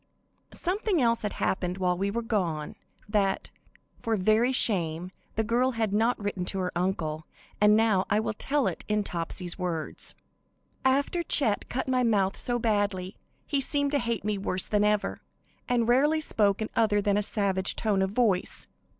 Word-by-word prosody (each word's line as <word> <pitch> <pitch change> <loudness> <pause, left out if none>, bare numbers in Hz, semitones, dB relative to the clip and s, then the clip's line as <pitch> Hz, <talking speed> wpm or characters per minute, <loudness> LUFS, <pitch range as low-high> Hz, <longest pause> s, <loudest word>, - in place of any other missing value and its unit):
Something 385 0 0
else 235 -3 +2
had 210 - -3
happened 180 -1 -1
while 180 -1 +1
we 195 +3 -1
were 235 +3 -2
gone, 175 -9 -2 0.3
that, 205 -2 0 0.5
for 225 -1 0
very 215 +5 +2
shame, 180 -8 +1 0.2
the 220 - +1
girl 245 +3 +1
had 220 -3 -1
not 225 +4 +2
written 205 -3 -3
to 195 - -3
her 180 -1 -1
uncle, 165 -4 -2 0.3
and 210 0 +6
now 215 -4 +2
I 210 - +3
will 220 - -2
tell 275 +5 -1
it - - -3
in 210 0 +1
Topsy's 175 0 -4
words: 170 -4 -3 0.7
"After 280 +6 +1
Chet 265 -10 +2
cut 260 +2 -3
my 255 -1 +2
mouth 200 -5 +2
so 245 -1 +3
badly, 205 -4 -1 0.3
he 280 -3 0
seemed 285 +1 +1
to 290 - +2
hate 230 -5 -2
me 210 -1 -1
worse 185 -1 -2
than 210 -1 +1
ever, 210 0 0 0.5
and 240 -2 +2
rarely 290 +6 +3
spoke 210 -8 +1
in 215 - -5
other 215 -2 +3
than 205 0 +1
a 205 - +2
savage 195 -2 0
tone 205 -3 0
of 190 - +1
voice. 205 -4 0
210 Hz, 175 wpm, -27 LUFS, 190-235 Hz, 0.7 s, and